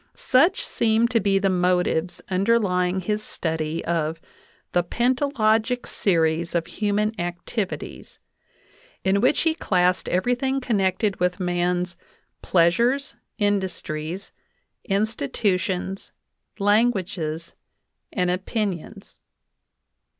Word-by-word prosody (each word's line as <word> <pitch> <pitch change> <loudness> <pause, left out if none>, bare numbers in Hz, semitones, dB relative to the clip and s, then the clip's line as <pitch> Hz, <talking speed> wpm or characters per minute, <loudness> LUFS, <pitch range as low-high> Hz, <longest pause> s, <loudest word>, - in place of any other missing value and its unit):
Such 345 - +3
seem 225 - +2
to 240 -2 +2
be 195 -1 +2
the 195 0 +2
motives 180 -1 +1
underlying 190 -2 +1
his 210 +3 -1
study 160 -4 -3
of 165 -1 -1 0.5
the 175 - +2
"pentalogic 245 +1 +1
series 165 -2 +1
of 170 -1 +1
human 210 +1 0
activities," 175 +4 -4 0.9
in 195 +1 +2
which 255 +5 +3
he 325 -1 +2
classed 180 - +1
everything 245 +8 +1
connected 205 -4 0
with 180 +1 0
man's 180 0 0 0.5
"pleasures, 235 - +2 0.2
industries, 190 -4 -2 0.5
in. 200 -2 +1
titutions, 190 - -2 0.5
languages, 190 -7 0 0.6
and 180 -3 +1
opinions." 195 +1 -4
190 Hz, 90 wpm, -24 LUFS, 180-220 Hz, 0.9 s, Such